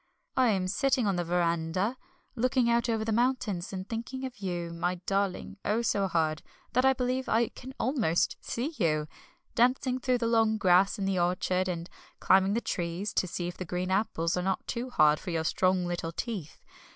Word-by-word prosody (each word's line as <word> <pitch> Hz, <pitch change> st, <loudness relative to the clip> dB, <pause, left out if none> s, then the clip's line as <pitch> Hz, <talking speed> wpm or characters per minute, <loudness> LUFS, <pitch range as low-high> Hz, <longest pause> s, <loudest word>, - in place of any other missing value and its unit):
I 260 Hz, -1 st, +4 dB
am 190 Hz, -4 st, +1 dB
sitting 260 Hz, +4 st, +1 dB
on 200 Hz, -2 st, +1 dB
the 175 Hz, -, 0 dB
verandah, 170 Hz, +5 st, 0 dB, 0.4 s
looking 255 Hz, 0 st, +2 dB
out 235 Hz, +1 st, +2 dB
over 220 Hz, -1 st, 0 dB
the 225 Hz, -, -1 dB
mountains, 220 Hz, -6 st, 0 dB
and 190 Hz, 0 st, -5 dB
thinking 240 Hz, +3 st, -4 dB
of 250 Hz, -4 st, -8 dB
you, 175 Hz, -3 st, -3 dB
my 175 Hz, +2 st, -1 dB
darling, 195 Hz, 0 st, -1 dB
oh, 220 Hz, +3 st, +1 dB
so 200 Hz, -4 st, +1 dB
hard, 160 Hz, -3 st, 0 dB, 0.3 s
that 255 Hz, -, +3 dB
I 265 Hz, 0 st, +5 dB
believe 255 Hz, +1 st, -1 dB
I 230 Hz, 0 st, +2 dB
can 260 Hz, +1 st, -11 dB
almost 230 Hz, -, +1 dB
see 265 Hz, +8 st, -3 dB
you, 155 Hz, -4 st, +1 dB, 0.5 s
dancing 255 Hz, +1 st, +2 dB
through 255 Hz, -1 st, +1 dB
the 235 Hz, -, -2 dB
long 225 Hz, -1 st, +3 dB
grass 190 Hz, -1 st, +4 dB
in 200 Hz, -, -2 dB
the 195 Hz, -2 st, +1 dB
orchard, 180 Hz, +1 st, +1 dB
and 170 Hz, -2 st, -3 dB, 0.3 s
climbing 190 Hz, +1 st, +4 dB
the 230 Hz, -, 0 dB
trees, 175 Hz, +3 st, -3 dB
to 185 Hz, -, +1 dB
see 175 Hz, 0 st, -3 dB
if 175 Hz, -, -6 dB
the -, -, -4 dB
green 180 Hz, +1 st, -3 dB
apples 180 Hz, -4 st, 0 dB
are 180 Hz, -, 0 dB
not 190 Hz, +1 st, -1 dB
too 250 Hz, +1 st, -3 dB
hard 155 Hz, -9 st, +4 dB
for -, -, -7 dB
your 165 Hz, -2 st, -1 dB
strong 185 Hz, +2 st, +2 dB
little 175 Hz, -2 st, -3 dB
teeth. 185 Hz, -3 st, -5 dB
195 Hz, 195 wpm, -29 LUFS, 175-235 Hz, 0.5 s, I